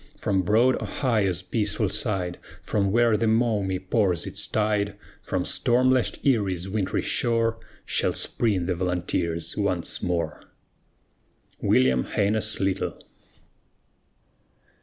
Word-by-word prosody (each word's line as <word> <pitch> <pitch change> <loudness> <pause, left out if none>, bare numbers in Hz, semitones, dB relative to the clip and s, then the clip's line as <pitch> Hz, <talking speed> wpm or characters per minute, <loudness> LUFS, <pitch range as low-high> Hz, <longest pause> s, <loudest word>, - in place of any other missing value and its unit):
From 100 -8 0
broad 115 +7 +3
Ohio's 100 -9 0
peaceful 105 +1 0
side, 95 -4 -2 0.2
From 100 -2 0
where 115 0 +4
the 110 +2 +1
Maumee 110 -4 +1
pours 95 -2 0
its - - -4
tide, 105 -1 0 0.3
From - - -2
storm 125 +2 +3
lashed 130 -2 0
Erie's 100 -9 +1
wintry 95 -1 -1
shore, 115 -1 +1 0.3
Shall - - +1
spring 100 -7 0
the 90 - 0
Volunteers 85 -2 -2
once 95 -5 -2
more. 85 -3 -2 1.2
WILLIAM 65 0 +3
HAINES 105 +1 0
LYTLE. 95 0 -1
100 Hz, 110 wpm, -25 LUFS, 90-110 Hz, 1.2 s, where